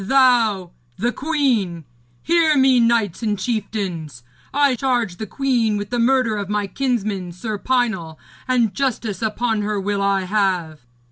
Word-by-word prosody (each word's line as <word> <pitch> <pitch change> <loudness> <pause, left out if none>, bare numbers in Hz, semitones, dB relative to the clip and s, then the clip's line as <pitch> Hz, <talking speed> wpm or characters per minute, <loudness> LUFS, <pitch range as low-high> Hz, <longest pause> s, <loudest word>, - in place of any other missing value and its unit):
Thou 225 -6 +3 0.3
the 240 +2 0
queen! 250 - 0 0.4
Hear 330 -3 +3
me, 265 -2 +5
knights 230 -5 +1
and 210 -3 0
chieftains. 190 - -4 0.3
I 280 -1 +3
charge 240 -7 -1
the 220 - -5
queen 235 -3 0
with 205 +1 -5
the 245 - 0
murder 240 -2 +2
of 200 -1 -4
my 210 0 0
kinsman, 205 -5 -2
Sir 210 +3 -5
Pinel, 220 -12 -1 0.3
and 240 -5 +2
justice 235 -7 -2
upon 220 0 0
her 210 0 -1
will 200 +1 -1
I 200 -1 +2
have.' 185 -5 -1
220 Hz, 145 wpm, -21 LUFS, 195-250 Hz, 0.4 s, me